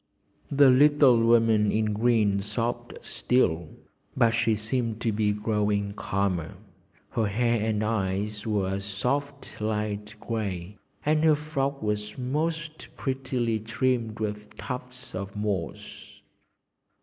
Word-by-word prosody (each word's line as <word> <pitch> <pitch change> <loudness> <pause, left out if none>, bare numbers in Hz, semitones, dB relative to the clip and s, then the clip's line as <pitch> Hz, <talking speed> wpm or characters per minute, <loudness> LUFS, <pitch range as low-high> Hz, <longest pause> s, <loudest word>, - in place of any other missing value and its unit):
The 140 -2 +6
little 140 -3 +6
woman 115 -2 +4
in 110 -1 +1
green 105 -3 +2
sobbed 120 +4 -3
still, 85 -10 +1 0.5
but 120 -3 +5
she 115 -1 +2
seemed 115 +1 -1
to 115 - +1
be 105 0 +1
growing 105 -1 0
calmer. 95 -5 -2 0.6
Her 110 -2 +1
hair 115 +1 +1
and 105 -1 0
eyes 105 0 -1
were 100 -3 0
a 100 - -2
soft 135 +8 -3
light 105 -1 -2
grey, 100 -4 -4 0.3
and 155 +1 +3
her 155 -1 +6
frock 140 -3 -2
was 105 0 -2
most 155 +4 -2
prettily 130 -4 -1
trimmed 115 0 -1
with 105 -1 -5
tufts 125 +3 -7
of 100 +2 -5
moss. 100 -7 -4
110 Hz, 120 wpm, -27 LUFS, 105-125 Hz, 0.6 s, The